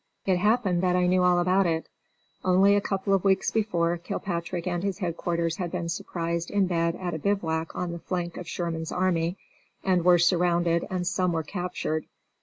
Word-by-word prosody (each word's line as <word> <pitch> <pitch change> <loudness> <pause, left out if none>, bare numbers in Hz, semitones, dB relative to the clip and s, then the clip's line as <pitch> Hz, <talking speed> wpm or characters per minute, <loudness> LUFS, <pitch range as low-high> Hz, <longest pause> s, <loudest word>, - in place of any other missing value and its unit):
It 185 -2 +2
happened 210 -4 +2
that 180 -1 +2
I 180 0 +3
knew 180 +1 +3
all 180 0 +4
about 185 +2 +3
it. 165 -1 -1 0.6
Only 190 +2 +5
a 205 - +2
couple 195 0 -1
of 195 - +2
weeks 195 -1 +2
before 175 -6 +1
Kilpatrick 170 0 -4
and 175 -1 -1
his 195 -1 -2
headquarters 170 -2 -2
had 180 -3 -3
been 170 -2 -3
surprised 170 0 -3
in 200 -1 +2
bed 170 -2 0
at 180 -2 -4
a 160 - -3
bivouac 165 -3 -1
on 180 -1 -2
the 170 - -6
flank 175 -1 -3
of 175 - -7
Sherman's 165 -2 -3
army, 180 -1 0 0.5
and 185 -3 +2
were 180 0 +6
surrounded 175 -1 +2
and 185 -1 -2
some 180 0 +1
were 160 -1 -1
captured. 175 -2 -3
175 Hz, 190 wpm, -26 LUFS, 170-185 Hz, 0.6 s, were